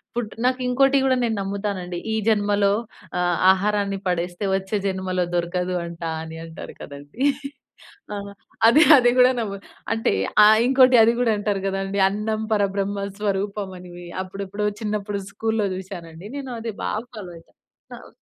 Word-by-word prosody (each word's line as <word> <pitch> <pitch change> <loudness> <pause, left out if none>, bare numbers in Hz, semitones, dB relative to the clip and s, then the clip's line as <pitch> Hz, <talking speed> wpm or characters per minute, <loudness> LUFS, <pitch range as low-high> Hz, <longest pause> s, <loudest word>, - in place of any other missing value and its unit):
Food 230 -3 -3
నాకింకోటి 255 +2 +2
కూడా 260 -1 +3
నేను 225 -2 0
నమ్ముతానండి. 195 -3 -3 0.2
ఈ - - +1
జన్మలో 205 -2 +3 0.5
ఆహ్, 175 -1 +1
ఆహారాన్ని 200 0 0
పడేస్తే 175 +2 -2
వచ్చే 190 +2 -4
జన్మలో 185 -1 -1
దొరకదు 180 +1 -1
అంటా 170 -1 -5
అని 160 0 -8
అంటారు 160 - -9
కదండీ. 145 - -10 0.9
ఆహ్, 200 0 -6 0.4
అది 290 +7 +6 0.2
అది 245 -2 +4
కూడా 250 +1 +7
నమ్ము 200 -3 -3 0.4
అంటే 225 - 0 0.3
ఆహ్, 215 +1 +7
ఇంకోటి 255 -1 +6
అది 230 - +4
కూడా 240 -2 +3
అంటారు 205 -1 -1
కదండీ, 195 +1 -2
"అన్నం 215 +2 -2
పరబ్రహ్మ 200 -1 0
స్వరూపం" 200 -1 -2
అని. 180 0 -12 0.3
అప్పుడెప్పుడో 200 +2 -4
చిన్నప్పుడు 210 -1 -2
స్కూలులో 220 -2 -1
చూసానండి. 180 -3 -9
నేను 265 -2 -6
అది 225 -2 -5
బాగా 215 +3 -2
ఫాలో 185 -5 -8
అయితా. 165 - -19 0.4
కావ్ - - -12
200 Hz, 140 wpm, -23 LUFS, 185-220 Hz, 0.9 s, కూడా